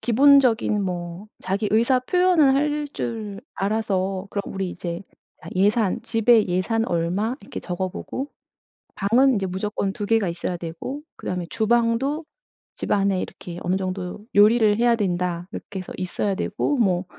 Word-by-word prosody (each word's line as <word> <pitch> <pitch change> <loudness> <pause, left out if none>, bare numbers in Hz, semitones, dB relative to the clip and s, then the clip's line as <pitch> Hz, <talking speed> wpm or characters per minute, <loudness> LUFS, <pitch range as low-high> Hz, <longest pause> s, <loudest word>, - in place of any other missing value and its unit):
기본적인 250 -4 +4
뭐 180 +2 -5
자기 200 +3 -1
의사 235 +4 +3
표현은 335 -2 +4
할 295 +1 0
줄 215 -4 -4
알아서 195 -2 -1
그럼 200 - -2
우리 190 -1 -2
이제 175 -1 -5 0.5
예산 205 +1 +2
집에 225 -1 +4
예산 225 +6 +1
얼마 180 +8 0
이렇게 200 - -7
적어보고 185 +9 -4 0.7
방은 245 +6 +4
이제 195 - 0
무조건 195 +1 -2
2 210 -2 -4
개가 225 -2 +2
있어야 175 +1 -3
되고 170 - -6
그다음에 180 -1 -4
주방도 235 +7 +1 0.5
집안에 195 -2 +1
이렇게 175 0 -7
"어느 180 - +1
정도 185 +1 -4
요리를 210 0 +5
해야 235 0 +4
된다." 180 -3 -1
이렇게 195 - -6
해서 185 - -8
있어야 190 +2 -1
되고 220 +9 -1
뭐 190 -6 +2
205 Hz, 305 characters per minute, -23 LUFS, 185-235 Hz, 0.7 s, 요리를